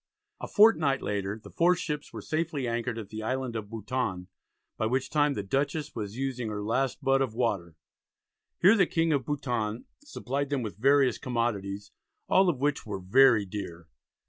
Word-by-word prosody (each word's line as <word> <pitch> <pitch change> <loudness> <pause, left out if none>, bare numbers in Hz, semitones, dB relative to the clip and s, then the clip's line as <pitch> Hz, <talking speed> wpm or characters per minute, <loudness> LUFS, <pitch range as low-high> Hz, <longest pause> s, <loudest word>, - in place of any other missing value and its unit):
A - - -5
fortnight 160 -11 +4
later 100 0 -2
the 110 - -14
four 175 +2 +3
ships 150 -4 -4
were - - -8
safely 155 -4 -2
anchored 120 0 -2
at 110 -3 -7
the 110 0 -6
island 130 +1 -2
of 105 -2 -5
Bouton, 110 -4 -3 0.5
by 110 - -1
which 130 +3 -1
time 145 -1 +2
the 100 - -3
Dutchess 140 +7 -1
was 105 0 -5
using 130 -4 -2
her 105 -1 -4
last 130 +6 -1
butt 135 0 +3
of 125 -5 -1
water. 100 -9 -1 0.8
Here 195 +5 +6
the 190 -5 +4
King 165 -1 +1
of 135 -4 -1
Bouton 120 -6 -2 0.2
supplied 140 - -3
them 140 -3 -1
with 105 - -5
various 135 +2 +3
commodities, 105 -6 -2 0.4
all 190 -1 +4
of 160 - 0
which 145 +1 0
"were 105 -3 -5
very 115 +3 +5
dear." 90 -4 -7
125 Hz, 175 wpm, -28 LUFS, 105-145 Hz, 0.8 s, Here